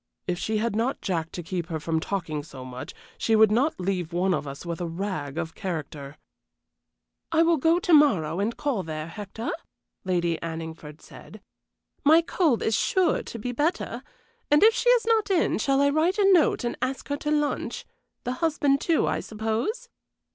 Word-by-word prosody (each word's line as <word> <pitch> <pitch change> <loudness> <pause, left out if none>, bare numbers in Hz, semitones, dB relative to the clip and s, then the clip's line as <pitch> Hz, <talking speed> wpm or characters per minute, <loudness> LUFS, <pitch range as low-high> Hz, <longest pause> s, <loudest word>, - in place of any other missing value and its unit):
If 175 -1 -2
she 220 +2 -1
had 225 0 -1
not 235 +5 0
Jack 165 -3 -2
to 175 - -5
keep 175 -1 -4
her 160 -2 -3
from 160 +1 -1
talking 165 -4 -3
so 135 -3 -10
much 125 0 -8 0.2
she 225 - +2
would 220 -1 +6
not 255 +5 +1
leave 180 -2 -2
one 180 +2 +1
of 150 - -2
us 140 +5 -8
with 170 +1 -4
a 175 - -2
rag 165 -5 -4
of 165 -1 -3
character." 150 -5 -6 1.1
"I 325 0 +4
will 335 0 +3
go 325 +4 +3
to 355 -1 +1
morrow 190 - +4
and 215 +4 -1
call 275 -9 -1
there, 155 -2 -5
Hector," 205 +6 -6 0.5
Lady 175 -3 0
Anningford 160 -2 -7
said. 215 - -13 0.6
"My 320 +3 +6
cold 325 - +1
is 220 - +1
sure 365 - +2
to - - -8
be 245 +3 -4
better; 295 +8 -1 0.5
and 295 +4 +5
if 445 +1 +7
she 485 - +1
is - - +4
not 450 -2 +2
in, 360 - +2
shall 270 +4 +2
I 285 0 +4
write 325 +6 +2
a 395 -2 +5
note 320 -6 +3
and 240 - -2
ask 260 +1 -3
her 285 - -1
to 295 - -4
lunch? 295 -1 -1 0.4
The 250 - -2
husband, 290 -4 +2
too, 330 -2 +2
I - - 0
suppose?" 220 - -3
215 Hz, 190 wpm, -26 LUFS, -, 1.1 s, if